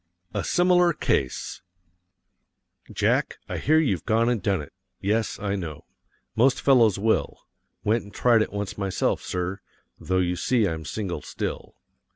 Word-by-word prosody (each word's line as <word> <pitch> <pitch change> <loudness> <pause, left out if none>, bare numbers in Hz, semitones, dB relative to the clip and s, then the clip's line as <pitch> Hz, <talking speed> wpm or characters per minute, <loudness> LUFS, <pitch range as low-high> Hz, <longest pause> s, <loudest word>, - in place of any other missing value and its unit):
A - - -1
SIMILAR 180 -1 +3
CASE 70 - -1 1.3
Jack, - - +1
I - - -4
hear 155 +1 +3
you've 130 - +1
gone 115 +1 +3
and 120 -4 0
done 95 0 +1
it. 75 - -9 0.3
Yes, 110 +3 0
I 100 -1 -1
know; 85 -7 -6 0.5
most 125 +4 +3
fellows 120 -8 +4
will; 110 +3 0 0.4
went 110 +1 +1
and 100 - -13
tried 120 0 +3
it - - -1
once 100 0 -4
myself, 95 -2 0
sir, 90 +1 -3 0.4
though 95 - -1
you 90 -1 +1
see 115 +3 +2
I'm 80 -2 -4
single 90 -4 -4
still. - - -5
105 Hz, 150 wpm, -25 LUFS, 90-120 Hz, 1.3 s, fellows